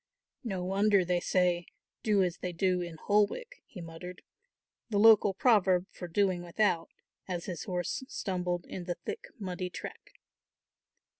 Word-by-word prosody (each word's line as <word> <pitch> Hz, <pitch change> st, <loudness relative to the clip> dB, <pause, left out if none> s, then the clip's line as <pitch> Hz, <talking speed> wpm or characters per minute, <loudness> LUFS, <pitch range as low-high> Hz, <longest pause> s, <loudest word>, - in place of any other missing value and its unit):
"No 190 Hz, -6 st, -3 dB
wonder 195 Hz, +1 st, +3 dB
they 180 Hz, 0 st, +1 dB
say, 175 Hz, -1 st, +1 dB, 0.3 s
'do 205 Hz, -3 st, +3 dB
as 180 Hz, -1 st, -1 dB
they 180 Hz, -1 st, -4 dB
do 180 Hz, +1 st, +1 dB
in 170 Hz, -2 st, -5 dB
Holwick,'" 210 Hz, -, 0 dB
he 185 Hz, -, -9 dB
muttered, 170 Hz, +2 st, -9 dB, 0.7 s
the 210 Hz, -, 0 dB
local 215 Hz, -1 st, +7 dB
proverb 190 Hz, -6 st, +4 dB
for 180 Hz, -, -7 dB
"doing 185 Hz, 0 st, +1 dB
without," 175 Hz, -1 st, +1 dB, 0.4 s
as 175 Hz, -2 st, -3 dB
his 175 Hz, -3 st, -5 dB
horse 180 Hz, +6 st, -2 dB
stumbled 180 Hz, -5 st, -2 dB
in 180 Hz, -, -7 dB
the 175 Hz, -1 st, -2 dB
thick 165 Hz, -, -6 dB
muddy 185 Hz, -2 st, -4 dB
track. 180 Hz, -, -9 dB
180 Hz, 145 wpm, -31 LUFS, 175-205 Hz, 0.7 s, local